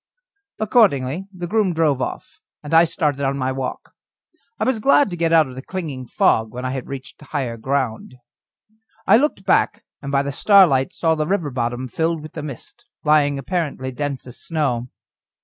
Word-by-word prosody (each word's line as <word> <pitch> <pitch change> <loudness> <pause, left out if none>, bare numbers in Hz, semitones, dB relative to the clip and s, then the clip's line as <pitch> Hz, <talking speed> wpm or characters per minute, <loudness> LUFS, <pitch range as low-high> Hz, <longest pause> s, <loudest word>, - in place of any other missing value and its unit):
Accordingly 195 - +2
the 180 -2 -6
groom 195 -2 +1
drove 150 -5 +2
off, - - -5 0.2
and 150 - -6
I 165 +1 +7
started 150 -4 -1
on 140 0 0
my 130 -1 -1
walk. 130 -1 -5 0.7
I - - 0
was 260 -3 +1
glad 275 -1 +4
to - - -3
get 165 -1 0
out 160 -2 +6
of 130 - -10
the 130 - -7
clinging 145 -7 -6
fog, 110 -1 +2
when 125 +1 -6
I 130 +1 -2
reached 130 +2 -8
higher 135 -5 -3
ground. 125 0 -2 0.9
I - - +6
looked 260 -8 0
back, 190 - +2 0.2
and 140 -2 -5
by 140 0 +2
the 140 - -3
starlight 160 -5 +5
saw 165 -1 +1
the 155 -1 -1
river 170 -6 -1
bottom 120 +1 -2
filled 160 +4 -1
with 155 - -10
the - - -5
mist, 145 -5 -10 0.2
lying 145 -2 +3
apparently 140 -3 -3
dense 140 +1 -4
as 125 - -10
snow. 135 -7 -1
145 Hz, 180 wpm, -21 LUFS, 130-170 Hz, 0.9 s, I